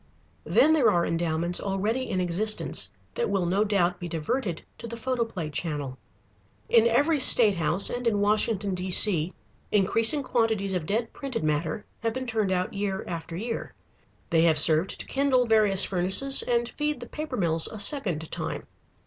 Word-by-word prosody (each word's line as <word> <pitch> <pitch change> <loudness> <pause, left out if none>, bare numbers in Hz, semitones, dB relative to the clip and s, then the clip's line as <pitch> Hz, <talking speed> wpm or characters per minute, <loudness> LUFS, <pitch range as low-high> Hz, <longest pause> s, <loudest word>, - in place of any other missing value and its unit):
Then 315 - +3
there 275 -8 +3
are 175 -4 +1
endowments 165 +1 -1
already 210 +6 -2
in 185 - -2
existence 185 +5 -1 0.2
that 480 -1 -2
will 190 -3 -1
no 190 +4 +1
doubt 180 -4 0
be 175 - -6
diverted 170 - -3 0.2
to - - -8
the 235 0 -8
photoplay 230 -10 -3
channel. 145 -4 -4 0.7
In 230 -1 +4
every 290 +7 +1
state 220 -6 +6
house, 170 +4 +1
and 245 0 -3
in 210 -3 +1
Washington, 205 -1 +1
D.C., 180 -2 +3 0.4
increasing 225 +8 +3
quantities 220 -6 -1
of 175 -4 -3
dead 225 +3 -2
printed 260 - -5
matter 155 +6 -2
have 225 0 -2
been 260 +1 -5
turned 220 -5 -1
out 185 0 -2
year 200 -1 -3
after 165 -1 -7
year. 230 +4 -6 0.6
They 165 - +3
have 160 -2 +3
served 155 +4 +2
to - - -3
kindle 270 -2 +1
various 215 -4 +3
furnaces 190 +9 +4
and 240 -1 -1
feed 295 +1 -3
the 240 - -8
paper 305 -4 -6
mills 165 -3 +1
a 220 - -9
second 200 - -1
time. 160 -3 -5
200 Hz, 165 wpm, -25 LUFS, 175-235 Hz, 0.7 s, state